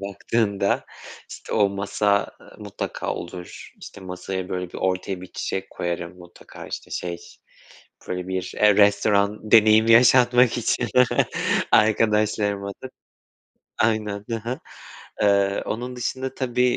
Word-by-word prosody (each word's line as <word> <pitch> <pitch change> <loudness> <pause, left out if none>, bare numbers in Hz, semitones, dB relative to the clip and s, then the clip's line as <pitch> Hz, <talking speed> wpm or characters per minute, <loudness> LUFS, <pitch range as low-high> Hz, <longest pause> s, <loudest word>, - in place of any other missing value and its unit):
baktığında 100 0 -1 0.5
işte - - -9
o 105 -2 +3
masa, 100 +1 0
eee, - - -17
mutlaka - - -5
olur, 90 +1 -9
işte, - - -11
masaya 95 0 -5
böyle 90 -1 -4
bir - - -22
ortaya 95 0 -2
bir 90 - -9
çiçek 95 0 -4
koyarım 85 0 -5
mutlaka 90 -1 -13
işte - - -7
şey 85 -1 -4 0.9
böyle 90 0 -4
bir 95 -1 -3
restoran 105 0 +3
deneyimi 110 0 +6
yaşatmak 125 +1 +5
için 120 +1 0 0.8
arkadaşlarıma 105 -2 +2
da 130 - -6 0.9
aynen. 105 -2 0
Hı 115 - -1
hı. 120 +4 -5 0.6
Eee, 100 -1 +2
onun 125 +3 -4
dışında 130 +2 -4
tabii, 125 -1 0
100 Hz, 120 wpm, -23 LUFS, 95-115 Hz, 0.9 s, deneyimi